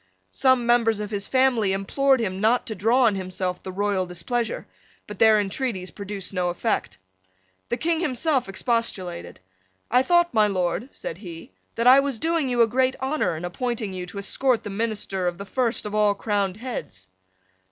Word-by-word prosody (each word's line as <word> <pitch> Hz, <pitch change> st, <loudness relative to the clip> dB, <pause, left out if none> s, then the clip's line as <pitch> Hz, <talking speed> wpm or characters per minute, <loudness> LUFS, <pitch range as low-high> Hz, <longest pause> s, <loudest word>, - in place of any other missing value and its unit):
Some 260 Hz, -, +3 dB
members 230 Hz, -2 st, +3 dB
of 210 Hz, 0 st, -5 dB
his 200 Hz, -2 st, -3 dB
family 250 Hz, -7 st, +2 dB
implored 265 Hz, +8 st, +2 dB
him 190 Hz, -4 st, -2 dB
not 230 Hz, +3 st, +3 dB
to 220 Hz, -, -4 dB
draw 225 Hz, +6 st, +2 dB
on 225 Hz, -3 st, +4 dB
himself 185 Hz, -1 st, -3 dB
the 190 Hz, -, -6 dB
royal 195 Hz, -1 st, 0 dB
displeasure: 220 Hz, +7 st, -3 dB, 0.4 s
but 210 Hz, -2 st, -9 dB
their 220 Hz, -1 st, +6 dB
intreaties 200 Hz, -2 st, -3 dB
produced 200 Hz, -2 st, -6 dB
no 180 Hz, -2 st, 0 dB
effect. 195 Hz, +6 st, -2 dB, 0.7 s
The 240 Hz, -, -1 dB
King 330 Hz, +2 st, 0 dB
himself 275 Hz, -, 0 dB
expostulated. 195 Hz, -, -2 dB, 0.5 s
"I 250 Hz, +2 st, +5 dB
thought, 345 Hz, +4 st, +3 dB
my 215 Hz, -2 st, +4 dB
Lord," 185 Hz, +4 st, -1 dB
said 165 Hz, -, -7 dB
he, 170 Hz, -, -10 dB, 0.2 s
"that 230 Hz, -, -1 dB
I 255 Hz, +2 st, +8 dB
was 275 Hz, -3 st, -1 dB
doing 325 Hz, -1 st, 0 dB
you 240 Hz, -1 st, +4 dB
a -, -, +3 dB
great 255 Hz, +3 st, +1 dB
honour 265 Hz, -, -1 dB
in 170 Hz, -, -5 dB
appointing 220 Hz, +2 st, -3 dB
you 180 Hz, -1 st, -5 dB
to 190 Hz, -, -10 dB
escort 245 Hz, +5 st, +1 dB
the 205 Hz, -, -6 dB
minister 205 Hz, -3 st, -2 dB
of 175 Hz, -1 st, -2 dB
the 200 Hz, -, -7 dB
first 240 Hz, +3 st, -1 dB
of 210 Hz, -, -5 dB
all 210 Hz, -1 st, +3 dB
crowned 200 Hz, -2 st, -1 dB
heads." 215 Hz, -, -6 dB
215 Hz, 180 wpm, -24 LUFS, 190-250 Hz, 0.7 s, I